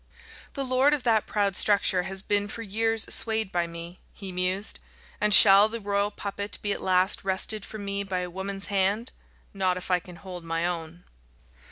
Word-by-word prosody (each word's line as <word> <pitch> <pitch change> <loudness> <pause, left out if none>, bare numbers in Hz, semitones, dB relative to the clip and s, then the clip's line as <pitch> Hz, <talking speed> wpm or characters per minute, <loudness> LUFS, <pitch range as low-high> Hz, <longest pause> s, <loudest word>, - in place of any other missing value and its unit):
"The 275 - -2
lord 260 +3 +3
of 275 - -7
that 225 -3 +2
proud 200 -2 0
structure 200 -3 +3
has 190 +1 -4
been 205 0 +1
for 230 +3 -7
years 225 +2 0
swayed 220 -3 -1
by 175 -1 0
me," 170 +1 -9
he 195 -2 -7
mused, 185 +3 -1 0.4
"and 210 0 +2
shall 200 +2 +8
the 230 +1 -5
royal 200 0 0
puppet 200 0 -5
be 205 - 0
at - - -2
last 185 +2 +1
wrested 195 +2 -2
from 210 -1 -8
me 200 0 -1
by 190 -2 -3
a 180 - -5
woman's 195 +2 -3
hand? 200 +4 0 0.4
Not 185 -2 +1
if 185 +1 -6
I 180 - +4
can 180 0 -13
hold 180 0 -9
my 165 0 -2
own." 170 0 -4
195 Hz, 190 wpm, -26 LUFS, 180-210 Hz, 0.4 s, shall